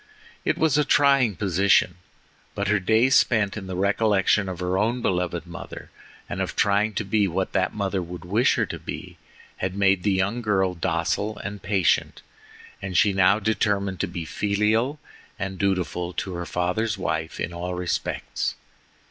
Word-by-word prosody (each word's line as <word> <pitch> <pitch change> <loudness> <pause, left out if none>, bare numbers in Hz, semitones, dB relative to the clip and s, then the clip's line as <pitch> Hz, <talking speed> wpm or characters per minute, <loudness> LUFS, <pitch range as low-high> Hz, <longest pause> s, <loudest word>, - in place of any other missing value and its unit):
It - - 0
was 155 -2 +3
a - - +4
trying 140 -7 +4
position; 95 -1 +2 0.6
but 100 0 -1
her 105 -1 +3
days 110 +7 +3
spent 110 -4 +3
in 100 -3 -6
the 95 - -4
recollection 100 0 +2
of 90 -2 -6
her 90 0 -1
own 115 +5 0
beloved 90 -1 -1
mother, 85 +2 -9 0.4
and - - -4
of - - -3
trying 105 +2 +2
to 110 - -2
be 100 +1 +2
what 95 +1 -2
that 95 0 0
mother 100 -2 -1
would 90 0 -8
wish 110 +8 +2
her - - +1
to - - -7
be, - - -8 0.4
had 95 0 -3
made 100 -2 +3
the 100 - +1
young 100 +6 0
girl 95 -4 +1
docile 85 +5 -1
and 105 -1 -6
patient, 95 -4 +1 0.6
and 95 -2 -2
she 100 +4 +4
now 95 +1 +4
determined 100 -3 0
to 100 - 0
be 85 -1 -5
filial 105 - 0 0.4
and 95 -1 -4
dutiful 90 -2 -1
to 95 - -4
her 85 0 -5
father's 100 +5 -1
wife, 80 -3 -3
in 85 - -3
all 90 +1 -4
respects. 90 -1 -2
100 Hz, 170 wpm, -24 LUFS, 90-105 Hz, 0.6 s, a